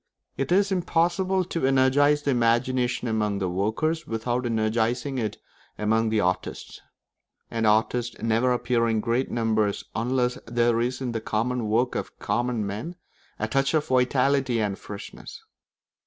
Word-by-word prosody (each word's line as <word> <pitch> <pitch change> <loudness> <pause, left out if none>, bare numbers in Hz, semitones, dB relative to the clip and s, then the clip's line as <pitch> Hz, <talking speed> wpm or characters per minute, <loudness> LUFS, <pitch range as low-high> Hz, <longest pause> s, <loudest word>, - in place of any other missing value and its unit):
It 135 +2 -3
is 195 +2 +3
impossible 185 +1 +1
to 170 -3 -4
energise 140 +2 +3
the 145 - +1
imagination 125 +1 +1
among 105 -2 0
the 95 -2 -1
workers 135 - -1
without 120 +2 -1
energising 115 +4 0
it 110 -2 -3 0.4
among 110 +1 +1
the 110 0 +1
artists; 90 -2 -2 0.7
and 115 -1 0
artists 115 +3 +1
never 115 +3 +2
appear 120 -1 +1
in 110 -1 +1
great 120 +4 0
numbers 110 -3 0
unless 125 +2 0
there 120 0 +2
is 125 +2 -2
in 125 -2 -2
the 115 -1 -3
common 115 +1 -1
work 120 +3 +2
of - - -5
common 120 -3 -1
men 110 - -5 0.4
a - - -2
touch 135 +2 +1
of 150 -1 +2
vitality 130 0 +2
and 100 -2 -1
freshness. 100 -1 -9
120 Hz, 145 wpm, -25 LUFS, 110-130 Hz, 0.7 s, is